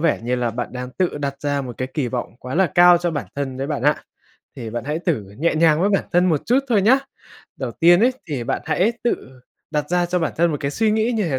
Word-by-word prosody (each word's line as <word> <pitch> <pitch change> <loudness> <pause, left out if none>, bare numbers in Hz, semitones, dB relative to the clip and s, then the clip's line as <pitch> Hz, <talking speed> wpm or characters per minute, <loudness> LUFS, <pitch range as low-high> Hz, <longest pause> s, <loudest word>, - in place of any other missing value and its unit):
vẻ 165 -1 +2
như 125 +2 -1
là 120 -1 -1
bạn 120 +2 -4
đang 125 0 -6
tự 175 +1 -1
đặt 140 -1 -4
ra 145 -1 -1
một 125 -3 -8
cái 130 - -2
kỳ 145 -6 -1
vọng 120 -2 -4
quá 125 +3 -6
là 190 +1 +4
cao 175 0 +7
cho 175 0 -1
bản 145 -3 -4
thân 135 -2 -3
đấy 135 +1 -3
bạn 145 -5 -3
ạ, 150 +2 +1 0.5
thì 115 - -6
bạn 120 +1 -4
hãy 150 +3 -2
thử 165 - -1 0.2
nhẹ 165 +2 +1
nhàng 160 0 +4
với 200 - +2
bản 195 - +1
thân 180 +1 +4
một 160 -5 0
chút 250 +3 +4
thôi 215 -5 +3
nhá. 255 +7 +5 0.6
Đầu 130 -3 -4
tiên 175 +2 +5
ấy, 250 +3 +4 0.2
thì 135 -6 -3
bạn - - -2
hãy 180 +9 +1
tự 130 - -3 0.3
đặt 150 -1 -2
ra 175 0 +2
cho 180 +1 0
bản 160 - -1
thân 170 +1 +3
một 150 - -1
cái 140 - -1
suy 220 +8 +1
nghĩ 220 +3 +1
như 215 -3 0
thế 130 - 0
155 Hz, 275 wpm, -21 LUFS, 130-180 Hz, 0.6 s, cao